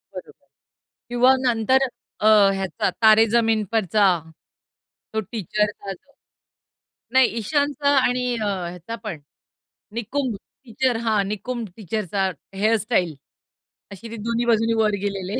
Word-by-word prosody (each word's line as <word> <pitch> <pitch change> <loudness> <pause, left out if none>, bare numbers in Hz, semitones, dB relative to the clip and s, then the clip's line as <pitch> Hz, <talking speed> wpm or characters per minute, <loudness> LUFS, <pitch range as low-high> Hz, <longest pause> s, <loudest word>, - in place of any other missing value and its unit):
बरोबर. - - -11 0.6
किंवा 245 +2 +4
नंतर 245 +3 +3 0.3
अ, 215 - +1 0.3
ह्याचा 195 -1 -2
तारे 220 0 +7
जमीन 225 -2 +2
परचा, 215 -2 +1 1.1
तो 220 - +1
टीचर 210 0 -1 0.2
अस 190 - -5 1.2
नाही, 260 -1 +6
ईशानचा 285 +4 0 0.2
आणि 250 0 0
अ, 220 - -3
ह्याचा 180 +2 -4
पण 175 -8 -5 0.7
निकुंब 235 +1 -2 0.3
टीचर 245 +1 0
हां, 215 -2 +2
निकुंब 230 +1 -4
टीचर 215 0 -3
चा 195 -1 +1 0.2
हेअर 215 +3 +2
स्टाईल, 185 - 0 0.8
असे 200 +4 -9
ते 230 - -6
दोन्ही 235 +1 0
बाजूंनी 225 0 +2
वर 210 -1 +2
गेलेले. 200 +2 -3
220 Hz, 120 wpm, -22 LUFS, 205-240 Hz, 1.2 s, तारे